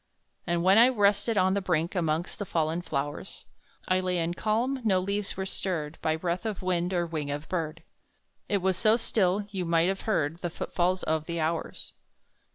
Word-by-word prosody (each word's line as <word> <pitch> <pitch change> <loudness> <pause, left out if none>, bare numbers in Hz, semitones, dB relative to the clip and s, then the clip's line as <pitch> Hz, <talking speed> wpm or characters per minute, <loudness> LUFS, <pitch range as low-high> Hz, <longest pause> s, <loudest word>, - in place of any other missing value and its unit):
And 170 -1 +1
when 190 +4 +6
I 240 +2 +8
rested 205 -1 +2
on 190 0 +4
the 200 - 0
brink, 170 -2 0
Amongst 165 -1 -1
the 205 - -2
fallen 165 +1 0
flowers, 145 -3 -4 0.4
I 185 0 +3
lay 185 -1 0
in 170 0 0
calm; 235 +8 0
no 195 -4 +3
leaves 200 +2 -3
were 190 - -2
stirred 170 -5 -3
By 155 0 +1
breath 170 +2 -2
of 215 -4 -4
wind, 180 -1 0
or 175 -2 +1
wing 155 -4 -4
of 145 +2 -4
bird; 165 -4 -3 0.7
It 200 -3 +1
was 190 -1 +2
so 215 +3 +4
still, 200 -3 +1
you 190 -2 -2
might 170 +1 +3
have 195 0 -2
heard 160 -5 0
The 175 - -2
footfalls 180 +2 -1
of 155 0 0
the 170 0 -3
hours. 160 +1 -3
180 Hz, 190 wpm, -28 LUFS, 165-200 Hz, 0.7 s, I